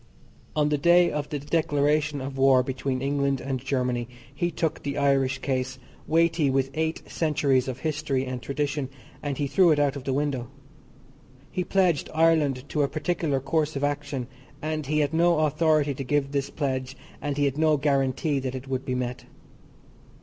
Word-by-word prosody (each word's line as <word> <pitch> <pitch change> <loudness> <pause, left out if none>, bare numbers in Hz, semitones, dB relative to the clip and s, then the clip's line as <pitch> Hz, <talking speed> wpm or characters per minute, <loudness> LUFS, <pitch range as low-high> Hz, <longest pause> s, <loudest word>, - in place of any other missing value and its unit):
On 150 -1 +2
the 150 -1 +1
day 175 +2 +5
of 150 -1 -3
the 150 - -2
declaration 145 -1 +1
of 135 +1 -5
war 135 -1 +5
between 130 0 -3
England 140 -1 +1
and 135 0 -3
Germany 125 -3 -1 0.3
he 175 +5 -1
took 160 -2 -2
the 140 0 -3
Irish 135 -2 +2
case, 130 -1 -2 0.3
weighty 165 -2 +3
with 135 0 +1
eight 160 +1 -2
centuries 140 -5 +1
of 130 -1 -5
history 150 -4 -1
and 130 -1 -4
tradition, 145 0 -2 0.3
and 140 -2 -3
he 145 - 0
threw 170 +6 +4
it 155 - +4
out 145 -1 +2
of 140 - -6
the 135 - 0
window. 135 -3 -1 1.0
He 185 - -1
pledged 180 -5 +1
Ireland 155 -5 +3
to 150 - 0
a 140 - +3
particular 155 -3 -1
course 150 +3 0
of 140 - -2
action, 145 -3 -2 0.3
and 155 -2 -3
he 150 +1 +2
had 145 +1 0
no 170 -1 +3
authority 155 -1 +2
to 135 - -5
give 140 +1 0
this 140 -1 -1
pledge 130 -3 -3 0.2
and 145 -1 -2
he 145 - +2
had 140 +1 -1
no 155 -1 +4
guarantee 140 +1 +1
that 130 0 -4
it 130 +1 -7
would 130 0 -2
be 130 - -2
met. 125 -1 -3
145 Hz, 180 wpm, -26 LUFS, 135-155 Hz, 1.0 s, day